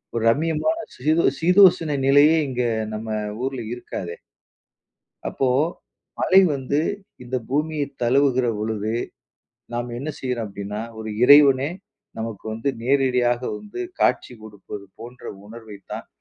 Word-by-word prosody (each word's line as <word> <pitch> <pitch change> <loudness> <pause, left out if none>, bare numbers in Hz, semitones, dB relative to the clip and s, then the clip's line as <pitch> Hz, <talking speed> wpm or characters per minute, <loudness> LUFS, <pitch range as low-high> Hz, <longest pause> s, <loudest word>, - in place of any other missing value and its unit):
ஒரு 115 - 0
ரம்மியமான 160 - +1 0.2
சீதோ 155 +6 +1 0.2
சீதோசன 175 -4 +5
நிலையே 145 +4 +6
இங்க 125 -2 -2 0.3
நம்ம 110 +1 -5 0.4
ஊர்ல 135 -1 -3
இருக்காதே! 90 -7 -6 1.1
அப்போ 135 - -1 0.7
மழை 190 - +6
வந்து 140 +1 -1 0.4
இந்த 125 +1 -4
பூமிய 150 +2 -1 0.2
தழுவுகிற 130 0 +3
பொழுது, 110 0 -2 0.8
நாம் 120 +1 -3
என்ன 140 +5 -5
செய்றோம் 125 -4 -3
அப்பிடின்னா, 100 +1 -6 0.2
ஒரு 110 0 -5
இறைவனே! 140 0 +7 0.5
நமக்கு 110 -3 -5
வந்து 115 +5 -3
நேரடியாக 125 -2 +2 0.2
வந்து 210 - -8 0.2
காட்சி - - +1
கொடுப்பது 105 -1 -9
போன்ற 120 +2 -11 0.2
உணர்வை 110 -1 -10 0.2
தான், - - -6
125 Hz, 115 wpm, -23 LUFS, 110-145 Hz, 1.1 s, இறைவனே